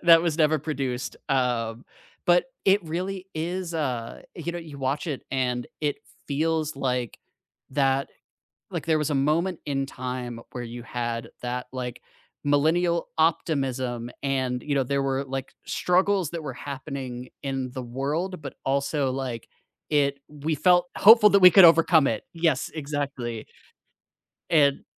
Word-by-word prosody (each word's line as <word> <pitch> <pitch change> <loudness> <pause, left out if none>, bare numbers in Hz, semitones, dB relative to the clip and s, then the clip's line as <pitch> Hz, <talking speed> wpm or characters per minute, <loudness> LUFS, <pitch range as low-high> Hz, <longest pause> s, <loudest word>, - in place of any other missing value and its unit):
that 165 -1 +8
was 165 -2 -1
never 155 -1 +4
produced, 135 -4 -3
um, 120 -3 0 0.4
but 175 0 +5 0.2
it 195 +1 +4
really 185 +3 -3
is, 170 +2 -3
uh 125 -7 -3
you 170 0 -4
know, 175 - -4
you 155 -4 -9
watch 135 +4 -1
it, 145 -5 -3
and 125 -2 -1 0.2
it 145 -1 0 0.3
feels 155 +1 0
like 125 -4 -2 0.5
that 135 0 +1 0.6
like - - -4
there 160 -1 +3
was 150 -1 0
a - - +1
moment 155 +6 +1
in 135 -2 -1
time 125 -2 -5
where 125 -1 -5
you 120 +1 -7
had 115 -1 -3
that, 125 +1 -3
like, 125 -2 -5 0.4
millennial 165 +4 +2
optimism, 130 -7 0
and, 130 -3 -1
you 145 - -1
know, 135 - +3
there 140 +2 0
were, 135 0 0
like, 135 0 -5
struggles 185 -1 +1
that 170 -2 -5
were 140 -4 -5
happening 130 -2 -6
in 135 -2 -3
the 130 -1 -5
world, 150 +9 -3
but 140 - -7
also, 140 0 0
like, 130 -3 -4 0.4
it 140 -2 +2
we 150 +2 -2
felt 175 +3 +4
hopeful 210 0 +8
that 200 0 +5
we 180 -1 +10
could 195 +1 +8
overcome 165 -3 +6
it. 110 - -1
Yes, 165 -5 +1
exactly. 140 -7 -4 1.0
And 145 -4 +4
140 Hz, 150 wpm, -26 LUFS, 130-165 Hz, 1.0 s, we